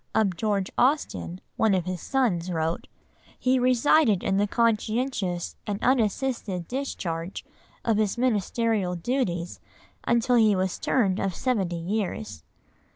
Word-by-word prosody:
Of 200 Hz, -5 st, +2 dB
George 200 Hz, 0 st, -1 dB
Austen 250 Hz, -, 0 dB, 0.2 s
one 220 Hz, -3 st, +3 dB
of 180 Hz, -3 st, -1 dB
his 185 Hz, -2 st, -4 dB
sons 210 Hz, -11 st, 0 dB
wrote— 165 Hz, 0 st, -2 dB, 0.5 s
"He 255 Hz, 0 st, +2 dB
resided 250 Hz, -, +4 dB
in 195 Hz, -, +1 dB
the 205 Hz, +1 st, +2 dB
conscientious 220 Hz, -4 st, 0 dB
and 205 Hz, -1 st, -1 dB
unassisted 225 Hz, -6 st, 0 dB
discharge 185 Hz, -10 st, -4 dB, 0.4 s
of 225 Hz, -3 st, +2 dB
his 215 Hz, +1 st, 0 dB
ministerial 220 Hz, -4 st, 0 dB
duties 175 Hz, -4 st, -2 dB, 0.4 s
until 235 Hz, +1 st, +2 dB
he 215 Hz, -3 st, +5 dB
was 185 Hz, -1 st, -1 dB
turned 200 Hz, -7 st, +1 dB
of 195 Hz, -3 st, -1 dB
seventy 200 Hz, -9 st, 0 dB
years." 205 Hz, +4 st, -3 dB
210 Hz, 125 wpm, -26 LUFS, 185-245 Hz, 0.5 s, he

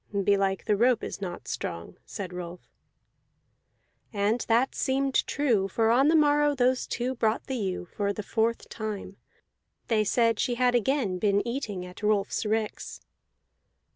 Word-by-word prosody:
"Belike 195 Hz, -1 st, +1 dB
the 210 Hz, -, +2 dB
rope 240 Hz, +2 st, +3 dB
is -, -, -6 dB
not 175 Hz, -3 st, -6 dB
strong," 85 Hz, 0 st, -5 dB
said 185 Hz, -3 st, -6 dB
Rolf. 175 Hz, 0 st, -8 dB, 1.4 s
And 210 Hz, +3 st, 0 dB
that 235 Hz, +4 st, +2 dB
seemed 270 Hz, 0 st, 0 dB
true; 235 Hz, -10 st, +1 dB
for 225 Hz, +3 st, +1 dB
on 265 Hz, +4 st, +4 dB
the 320 Hz, -, +4 dB
morrow 295 Hz, -1 st, +4 dB
those 255 Hz, 0 st, +1 dB
two 250 Hz, +2 st, -2 dB
brought 225 Hz, -3 st, 0 dB
the 265 Hz, -, -3 dB
ewe 190 Hz, -5 st, -3 dB
for 200 Hz, +3 st, -2 dB
the 210 Hz, +1 st, -5 dB
fourth 230 Hz, +2 st, -1 dB
time; 210 Hz, -3 st, -6 dB, 0.7 s
they 220 Hz, -2 st, +3 dB
said 230 Hz, +1 st, +2 dB
she 245 Hz, -, 0 dB
had 250 Hz, 0 st, +2 dB
again 240 Hz, -5 st, +1 dB
been 205 Hz, +2 st, +1 dB
eating 215 Hz, -7 st, -4 dB
at 180 Hz, +2 st, -11 dB
Rolfs 210 Hz, 0 st, 0 dB
ricks. 215 Hz, 0 st, -2 dB
220 Hz, 150 wpm, -27 LUFS, 200-250 Hz, 1.4 s, on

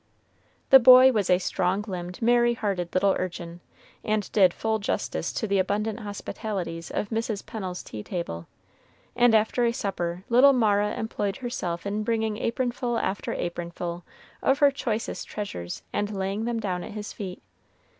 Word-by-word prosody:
The 270 Hz, -, +11 dB
boy 255 Hz, +1 st, +9 dB
was 210 Hz, -6 st, 0 dB
a 180 Hz, -, +6 dB
strong 190 Hz, +2 st, -1 dB
limbed, 180 Hz, 0 st, -5 dB
merry 240 Hz, 0 st, +4 dB
hearted 195 Hz, -6 st, -2 dB
little 195 Hz, +1 st, +4 dB
urchin, 175 Hz, -1 st, -5 dB, 0.4 s
and 215 Hz, -2 st, -1 dB
did 190 Hz, -4 st, +5 dB
full 220 Hz, +4 st, -1 dB
justice 200 Hz, -, -2 dB
to -, -, -2 dB
the 200 Hz, -2 st, +1 dB
abundant 210 Hz, +3 st, -1 dB
hospitalities 200 Hz, -4 st, -5 dB
of 210 Hz, -, -3 dB
Mrs. 225 Hz, -2 st, -2 dB
Pennel's 185 Hz, -5 st, -5 dB
tea 105 Hz, -, -7 dB
table; 105 Hz, -, -5 dB, 0.7 s
and 240 Hz, -2 st, +5 dB
after 230 Hz, +2 st, +2 dB
supper 180 Hz, -5 st, -3 dB
little 255 Hz, +4 st, +6 dB
Mara 210 Hz, -4 st, +2 dB
employed 205 Hz, -3 st, -3 dB
herself 185 Hz, -9 st, -4 dB
in 205 Hz, +1 st, -1 dB
bringing 220 Hz, -1 st, 0 dB
apronful 245 Hz, 0 st, -1 dB
after 195 Hz, -, -2 dB
apronful 170 Hz, 0 st, -4 dB, 0.4 s
of 270 Hz, -, +3 dB
her 285 Hz, -1 st, +5 dB
choicest 230 Hz, -5 st, -3 dB
treasures, 90 Hz, -, -6 dB
and 205 Hz, 0 st, -1 dB
laying 195 Hz, +2 st, -2 dB
them 235 Hz, -1 st, -1 dB
down 185 Hz, -4 st, -2 dB
at -, -, -8 dB
his 210 Hz, 0 st, -6 dB
feet. 190 Hz, -3 st, -7 dB
205 Hz, 155 wpm, -26 LUFS, 180-230 Hz, 0.7 s, The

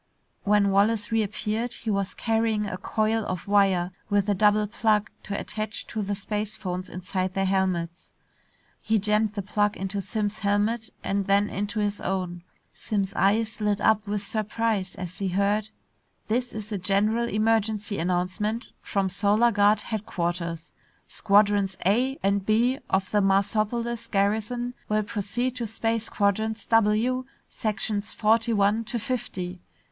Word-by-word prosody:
When 205 Hz, -1 st, +4 dB
Wallace 210 Hz, +2 st, +2 dB
reappeared, 220 Hz, +2 st, -1 dB
he 225 Hz, -, -3 dB
was 200 Hz, -1 st, -1 dB
carrying 225 Hz, -2 st, +1 dB
a 195 Hz, -, -3 dB
coil 215 Hz, +3 st, 0 dB
of 185 Hz, -2 st, -4 dB
wire 195 Hz, -3 st, +3 dB, 0.2 s
with 205 Hz, -1 st, +2 dB
a -, -, +4 dB
double 210 Hz, +2 st, +4 dB
plug 210 Hz, 0 st, +1 dB
to 200 Hz, -, -4 dB
attach 215 Hz, +1 st, -4 dB
to 220 Hz, -, -3 dB
the 200 Hz, 0 st, -2 dB
spacephones 195 Hz, -3 st, -4 dB
inside 185 Hz, +1 st, -3 dB
their 195 Hz, 0 st, +1 dB
helmets. 185 Hz, -3 st, -1 dB, 0.7 s
He 220 Hz, 0 st, +2 dB
jammed 210 Hz, +1 st, +1 dB
the 200 Hz, -2 st, -3 dB
plug 205 Hz, +1 st, 0 dB
into 195 Hz, +1 st, -3 dB
Simms' 210 Hz, +1 st, -2 dB
helmet 210 Hz, +2 st, 0 dB
and 200 Hz, 0 st, -1 dB
then 200 Hz, +1 st, +3 dB
into 205 Hz, +3 st, -2 dB
his 205 Hz, -1 st, -1 dB
own. 180 Hz, -2 st, -2 dB, 0.3 s
Simms' 200 Hz, -3 st, -2 dB
eyes 215 Hz, +2 st, +1 dB
lit 205 Hz, -1 st, +1 dB
up 215 Hz, 0 st, +2 dB
with 205 Hz, 0 st, -1 dB
surprise 215 Hz, -2 st, -1 dB
as 180 Hz, 0 st, -7 dB
he 195 Hz, -, -1 dB
heard.... 200 Hz, +3 st, +1 dB, 0.6 s
"...This 245 Hz, +3 st, 0 dB
is 215 Hz, 0 st, -7 dB
a 205 Hz, -, -2 dB
general 210 Hz, +5 st, +2 dB
emergency 215 Hz, -1 st, +1 dB
announcement 185 Hz, +6 st, -1 dB
from 195 Hz, -2 st, 0 dB
Solar 205 Hz, +5 st, +3 dB
Guard 205 Hz, 0 st, +4 dB
headquarters. 175 Hz, -6 st, -3 dB, 0.4 s
Squadrons 200 Hz, -2 st, +3 dB
A 250 Hz, +8 st, +2 dB
and 200 Hz, 0 st, +2 dB
B 235 Hz, +6 st, +2 dB
of 190 Hz, 0 st, 0 dB
the 210 Hz, -, +3 dB
Marsopolis 215 Hz, +4 st, +1 dB
garrison 220 Hz, +5 st, 0 dB, 0.2 s
will 215 Hz, 0 st, +2 dB
proceed 235 Hz, +4 st, -2 dB
to 235 Hz, -2 st, -2 dB
space 225 Hz, +1 st, -1 dB
quadrants 220 Hz, +2 st, 0 dB
W, 225 Hz, +3 st, +2 dB, 0.3 s
sections 210 Hz, -1 st, -2 dB
forty 225 Hz, +2 st, +3 dB
one 205 Hz, +1 st, +2 dB
to 240 Hz, -, -2 dB
fifty. 185 Hz, -7 st, -4 dB
210 Hz, 145 wpm, -26 LUFS, 195-220 Hz, 0.7 s, When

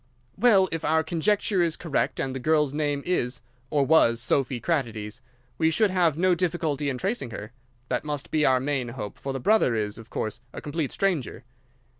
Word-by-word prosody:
"Well, 200 Hz, -6 st, +5 dB
if 165 Hz, -1 st, -3 dB
our 160 Hz, +1 st, +2 dB
conjecture 185 Hz, +4 st, +1 dB
is 170 Hz, -2 st, 0 dB
correct 165 Hz, -5 st, -1 dB
and 130 Hz, -, -2 dB
the 130 Hz, -, -4 dB
girl's 150 Hz, 0 st, +2 dB
name 145 Hz, -2 st, -1 dB
is 125 Hz, -8 st, -1 dB, 0.3 s
or 145 Hz, -2 st, +2 dB
was 125 Hz, -7 st, +4 dB
Sophy 125 Hz, +1 st, 0 dB
Kratides, 115 Hz, -7 st, -2 dB, 0.4 s
we 160 Hz, -, +4 dB
should 200 Hz, +5 st, +2 dB
have 170 Hz, -5 st, +2 dB
no 185 Hz, +1 st, +3 dB
difficulty 160 Hz, -5 st, -1 dB
in 130 Hz, -, -2 dB
tracing 195 Hz, -, -2 dB
her. 105 Hz, 0 st, -7 dB, 0.4 s
That 125 Hz, -1 st, -1 dB
must 145 Hz, -2 st, -4 dB
be 155 Hz, -1 st, +2 dB
our 130 Hz, -2 st, +4 dB
main 135 Hz, -2 st, -1 dB
hope, 110 Hz, -4 st, -7 dB
for 135 Hz, -, -4 dB
the 135 Hz, -, -3 dB
brother 205 Hz, -, +3 dB
is, 105 Hz, -1 st, -2 dB
of 115 Hz, +1 st, -13 dB
course, 110 Hz, -1 st, -3 dB
a -, -, -6 dB
complete 150 Hz, -1 st, -3 dB
stranger. 175 Hz, -, -1 dB
145 Hz, 190 wpm, -26 LUFS, 125-170 Hz, 0.4 s, Well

